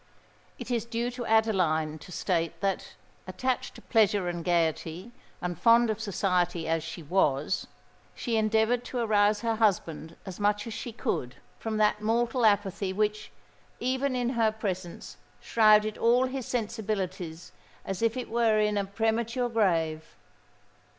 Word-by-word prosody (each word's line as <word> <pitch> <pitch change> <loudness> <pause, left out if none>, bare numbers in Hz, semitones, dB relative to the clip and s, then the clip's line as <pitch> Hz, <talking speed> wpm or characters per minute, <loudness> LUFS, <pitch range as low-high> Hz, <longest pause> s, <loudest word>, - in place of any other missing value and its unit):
It - - -7
is 235 -2 0
due 235 +1 -2
to 240 -1 -6
Adeline 180 -9 +2
to 180 - -13
state 170 -2 -1
that,—attached 200 +4 -3
to - - -13
pleasure 205 -5 +2
and 175 -1 -3
gaiety, 170 +3 -1 0.3
and 175 0 -2
fond 230 +2 +5
of 215 0 -4
society 180 -5 0
as 165 -1 0
she 170 - -7
was,—she 170 - -2
endeavoured 220 +2 +2
to 250 - -5
arouse 210 -2 +2
her 230 -1 0
husband 170 -7 0
as 190 -1 -8
much 205 0 +1
as 230 - -6
she 240 +2 -5
could 130 - -3 0.2
from 220 -1 -3
that 210 0 +2
mortal 230 +2 +2
apathy 200 -2 +1
which, 210 +2 -1 0.5
even 260 +2 0
in 245 -1 0
her 230 -3 +2
presence, 185 -5 -5 0.2
shrouded 215 -1 +4
all 245 +2 +4
his 260 -1 -4
sensibilities 195 -7 -3 0.3
as 195 0 -4
it 230 +2 0
were 230 -2 +2
in 210 -1 +2
a 200 - -1
premature 230 +4 -1
grave. 165 -8 0
215 Hz, 140 wpm, -28 LUFS, 180-230 Hz, 0.5 s, fond